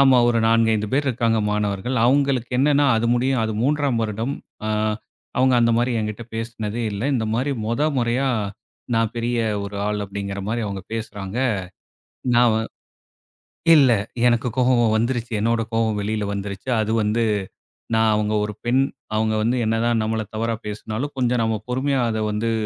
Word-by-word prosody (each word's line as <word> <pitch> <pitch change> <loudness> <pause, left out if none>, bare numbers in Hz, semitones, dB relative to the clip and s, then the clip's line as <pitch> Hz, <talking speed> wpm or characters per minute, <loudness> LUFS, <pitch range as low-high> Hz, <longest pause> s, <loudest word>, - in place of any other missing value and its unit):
ஆமா. 135 -2 +6
ஒரு 115 -1 +2
4,5 115 -2 +3
பேர் 140 +1 +1
இருக்காங்க, 115 -2 +1
மாணவர்கள். 105 +4 -1
அவுங்களுக்கு 135 -2 +2
என்னான்னா, 145 +1 +4
அது 115 +1 +1
முடியும் 130 0 +1
அது 110 - -2
3ஆம் 140 -3 +1
வருடம். 110 +6 -2 0.3
ஆ, - - -1 0.7
அவுங்க 130 0 +4
அந்த 115 0 +4
மாரி 120 +1 +1
என்கிட்ட 105 +2 -4
பேசுனதே 115 0 -4
இல்ல. 100 +2 -4
இந்த 115 -3 0
மாரி 135 +4 0
மொத 115 +6 0 0.2
மொறயா, 120 +3 +1 0.7
"நான் 115 -1 +1
பெரிய, 120 +1 -1 0.3
ஒரு 100 0 -6
ஆள்" 105 0 -1
அப்டிங்கிற 100 0 -5
மாரி, 115 +1 -1
அவுங்க 100 -1 -5
பேசுறாங்க. 105 -1 -5 1.0
நான் 120 -1 +5
வ - - +2 1.2
இல்ல, 135 -5 +6 0.4
எனக்கு 120 +1 +2
கோவம் 120 -3 +3
வந்துருச்சு. 120 0 -1
என்னோட 115 +1 +1
கோவம் 110 -2 +1
வெளியில 105 +1 -2
வந்துருச்சு. 100 +3 -5
அது 110 +1 -1
வந்து, 105 +3 +1 0.7
நான் 110 0 +4
அவுங்க 105 0 0
ஒரு 105 - -4
பெண், 130 +3 +3 0.3
அவுங்க 110 0 +1
வந்து 120 +3 +1
என்னதான் 115 +1 +1
நம்மள 110 0 -1
தவறா 115 +1 -1
பேசுனாலும், 110 +6 -4
கொஞ்சம் 125 -1 +1
நம்ம 110 -1 +1
பொறுமையா, 135 +1 +1
அத 110 - -2
வந்து 110 +2 -1
115 Hz, 155 wpm, -22 LUFS, 110-125 Hz, 1.2 s, ஆமா